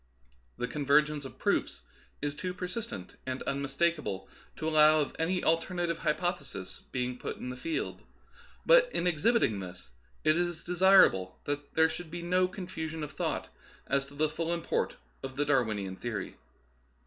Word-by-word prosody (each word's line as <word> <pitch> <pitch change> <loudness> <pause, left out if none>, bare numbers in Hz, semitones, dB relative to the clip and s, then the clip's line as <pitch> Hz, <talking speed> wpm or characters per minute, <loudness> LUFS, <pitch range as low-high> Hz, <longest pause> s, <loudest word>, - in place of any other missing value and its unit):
The 125 - -1
convergence 150 +1 +2
of 135 - -9
proofs - - 0 0.4
is 145 -1 0
too 180 +4 -4
per 185 - -4
sistent 180 - -6
and 130 0 -3
unmistakable 140 - -1 0.3
to 160 - -3
allow 155 0 +6
of 145 - -1
any 180 +3 +1
alter 165 +3 +1
native 170 -2 0
hypothesis 155 - -2
being 125 0 -2
put - - -4
in 125 - -5
the 125 - -4
field. 320 - -3 0.6
But, - - +6
in - - 0
exhibiting 180 - +2
this, 90 -9 -9 0.3
it 155 - +4
is 175 -2 -1
desirable 175 - +5
that 145 0 -4
there 160 0 +6
should 170 +1 -6
be 170 +1 -6
no 180 +1 +3
confusion 160 -4 -5
of 150 - -5
thought - - -2 0.4
as 140 0 0
to 140 - -14
the 155 +2 +2
full 165 +2 -3
import 170 -1 -1 0.3
of 130 -1 -6
the 145 +2 +1
Darwinian 110 -9 +1
theory. 120 -4 -4
155 Hz, 160 wpm, -30 LUFS, 135-175 Hz, 0.6 s, allow